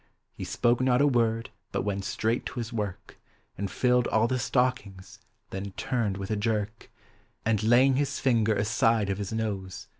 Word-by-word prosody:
He -, -, -7 dB
spoke 120 Hz, +1 st, +1 dB
not 125 Hz, -1 st, +3 dB
a 145 Hz, -, +5 dB
word, 115 Hz, -4 st, +1 dB, 0.2 s
but -, -, -1 dB
went 100 Hz, -1 st, -2 dB
straight 110 Hz, +4 st, -1 dB
to -, -, -6 dB
his 120 Hz, 0 st, -5 dB
work. 105 Hz, -5 st, -5 dB, 0.4 s
And 100 Hz, 0 st, -3 dB
tilled 125 Hz, +1 st, +2 dB
all 110 Hz, +1 st, +2 dB
the 130 Hz, +1 st, -1 dB
stockiugs; 115 Hz, -7 st, -1 dB, 0.3 s
then 95 Hz, 0 st, -5 dB
turned 115 Hz, -7 st, -1 dB
with 100 Hz, +1 st, -5 dB
a -, -, +2 dB
jerk, 105 Hz, 0 st, -2 dB, 0.6 s
And 110 Hz, -2 st, +2 dB
laying 125 Hz, +4 st, +5 dB
his 140 Hz, -1 st, -2 dB
linger 110 Hz, -4 st, +3 dB
aside 105 Hz, 0 st, +2 dB
of 95 Hz, -, -3 dB
his 100 Hz, 0 st, -4 dB
nose. 100 Hz, -4 st, -4 dB
110 Hz, 175 wpm, -28 LUFS, 100-125 Hz, 0.6 s, a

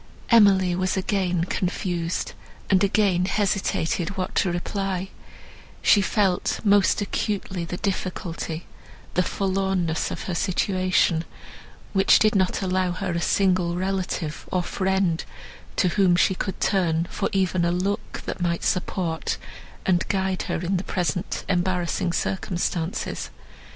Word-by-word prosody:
Emily 195 Hz, -5 st, +6 dB
was 185 Hz, +1 st, 0 dB
again 185 Hz, -3 st, 0 dB
confused, 175 Hz, -1 st, -2 dB, 0.4 s
and 190 Hz, -1 st, +4 dB
again 195 Hz, -3 st, +3 dB
hesitated 195 Hz, -2 st, 0 dB
what 185 Hz, -, -2 dB
to 185 Hz, -, +2 dB
reply; 190 Hz, +1 st, -2 dB, 0.7 s
she 205 Hz, -, +6 dB
felt 195 Hz, -2 st, +1 dB
most 205 Hz, 0 st, +4 dB
acutely 195 Hz, -4 st, -2 dB
the 175 Hz, +1 st, -5 dB
difficulty—the 180 Hz, -3 st, -4 dB
forlornness 190 Hz, -3 st, 0 dB
of -, -, -5 dB
her 185 Hz, -, -3 dB
situation, 185 Hz, -2 st, +1 dB, 0.7 s
which 195 Hz, -1 st, +6 dB
did 215 Hz, -1 st, +3 dB
not 190 Hz, -1 st, +1 dB
allow 185 Hz, -1 st, +1 dB
her 185 Hz, 0 st, -3 dB
a 170 Hz, 0 st, -1 dB
single 180 Hz, -2 st, +2 dB
relative, 185 Hz, -4 st, -3 dB
or 185 Hz, -1 st, +1 dB
friend, 190 Hz, -3 st, 0 dB, 0.5 s
to 185 Hz, -, +3 dB
whom 185 Hz, -1 st, +3 dB
she 185 Hz, +2 st, +3 dB
could 190 Hz, 0 st, -4 dB
turn 170 Hz, -4 st, +1 dB
for -, -, -1 dB
even 185 Hz, -2 st, +1 dB
a 170 Hz, -, +2 dB
look, 190 Hz, +3 st, -2 dB
that -, -, -5 dB
might 170 Hz, -1 st, 0 dB
support 180 Hz, -3 st, -1 dB, 0.5 s
and 175 Hz, -2 st, +2 dB
guide 190 Hz, -2 st, 0 dB
her -, -, -1 dB
in 185 Hz, +2 st, 0 dB
the 180 Hz, -, -3 dB
present 180 Hz, 0 st, -2 dB
embarrassing 180 Hz, -1 st, 0 dB
circumstances. 175 Hz, -1 st, -2 dB
185 Hz, 125 wpm, -24 LUFS, 175-195 Hz, 0.7 s, Emily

